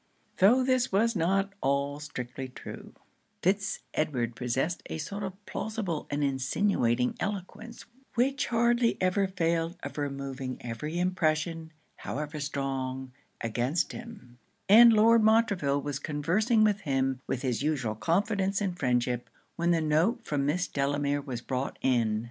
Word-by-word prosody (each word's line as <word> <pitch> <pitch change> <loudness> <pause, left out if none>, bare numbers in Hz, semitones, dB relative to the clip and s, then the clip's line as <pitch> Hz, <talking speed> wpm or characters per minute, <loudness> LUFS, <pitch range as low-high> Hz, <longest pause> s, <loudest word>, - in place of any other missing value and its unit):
Though 235 +7 +5
this 255 -1 +2
was 225 +4 +2
not 195 +3 +1
all 140 +1 0
strictly 130 -3 -6
true, 125 - -10 0.5
Fitz 195 +1 +1
Edward 125 -7 -1
possessed 130 +9 -1
a - - -3
sort 200 +6 -5
of 195 +1 -7
plausible 215 -8 -3
and 145 +1 -1
insinuating 130 - +1
eloquence, 210 +4 -5 0.3
which 270 +4 +1
hardly 235 0 +2
ever 190 +2 +2
failed 170 -2 -1
of - - -5
removing 135 -2 -4
every 125 +8 -4
impression, 165 -2 0 0.3
however 150 +1 -5
strong, 135 -2 -3 0.3
against 125 +9 0
him; 220 - -11 0.3
and 230 +4 +9
Lord 225 +1 +6
Montreville 200 -11 +3
was 145 -2 -3
conversing 180 - +1
with 210 -1 +3
him 135 -2 0
with 130 - -2
his 125 -3 -1
usual 140 -7 0
confidence 195 - 0
and 185 -4 -2
friendship, 125 -1 0 0.3
when 170 +1 0
the 170 -2 +3
note 165 +10 +1
from 140 -2 0
Miss 180 +5 +1
Delamere 145 +1 0
was 130 -4 -5
brought 130 +2 -3
in. 115 -4 +2
155 Hz, 135 wpm, -29 LUFS, 135-200 Hz, 0.5 s, and